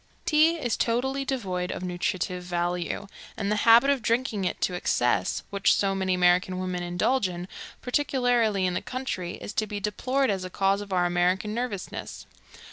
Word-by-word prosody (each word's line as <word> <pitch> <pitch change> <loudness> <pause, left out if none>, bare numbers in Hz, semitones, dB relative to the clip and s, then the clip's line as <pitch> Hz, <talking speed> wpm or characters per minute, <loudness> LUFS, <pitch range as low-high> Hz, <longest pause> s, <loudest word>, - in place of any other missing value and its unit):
Tea 315 +2 +4
is 245 -8 -2
totally 265 +4 0
devoid 190 -10 -2
of - - -5
nutritive 180 0 -2
value, 175 +2 -2 0.3
and 200 -2 -1
the 210 - +1
habit 240 +5 +7
of 275 -3 0
drinking 230 -3 0
it - - -2
to 180 - +1
excess, 120 - 0
which 200 -1 +3
so 195 -1 +1
many 190 -1 0
American 180 +1 +3
women 185 -1 -3
indulge 180 +6 +1
in, 175 0 -6 0.4
particularly 245 -7 +1
in 180 - 0
the 180 - -1
country, 250 -9 -4
is 205 - -8
to 215 - 0
be 205 0 -4
deplored 255 +5 0
as 190 -2 -2
a 185 - -5
cause 195 +2 +1
of 205 -1 -9
our 180 -1 +2
American 180 +4 +1
nervousness. 235 -5 -5
195 Hz, 175 wpm, -26 LUFS, 180-245 Hz, 0.4 s, habit